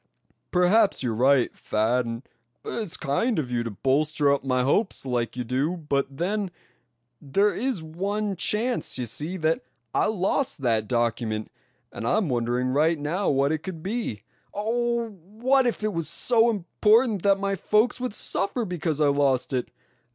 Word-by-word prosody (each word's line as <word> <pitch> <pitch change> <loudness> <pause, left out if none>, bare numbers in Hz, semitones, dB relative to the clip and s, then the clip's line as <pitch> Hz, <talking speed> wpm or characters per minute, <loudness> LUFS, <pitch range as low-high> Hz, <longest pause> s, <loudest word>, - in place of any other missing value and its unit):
"Perhaps 190 +1 +3
you're 120 -3 0
right, 130 +2 +3
Thad, 115 +3 0
and 115 +2 -6 0.4
it's 215 -7 -3
kind 170 - 0
of 135 -6 -2
you 120 -1 0
to 115 - -3
bolster 140 - +1
up 140 - -1
my 130 -2 +1
hopes 170 - 0
like 125 -1 -2
you 125 - -1
do; 135 +9 -1
but 145 -4 -1
then, 195 +4 -1 0.7
there 195 +9 +2
is 235 -7 -2
one 200 +5 -2
chance, 220 - -1
you 125 - -2
see, 150 - -4
that 160 -1 +1 0.3
I - - +2
lost 215 - -1
that 110 -3 +1
document; 115 -2 -1 0.4
and 115 - -5
I'm 200 - +1
wondering 120 +1 0
right 155 +5 +2
now 160 +7 -1
what 140 +1 +2
it 160 - 0
could 165 -1 -7
be. 195 - -3 0.3
Oh! 235 +2 0
what 220 +8 0
if 235 - -2
it 215 -1 0
was 165 -2 -2
so 230 +7 +3
important 215 +2 +2
that 200 +1 +4
my 195 0 0
folks 215 +6 +2
would 250 -4 -3
suffer 225 +4 0
because 170 -5 -2
I 150 -2 +4
lost 140 -2 +1
it? 125 -1 -1
160 Hz, 165 wpm, -25 LUFS, 130-210 Hz, 0.7 s, that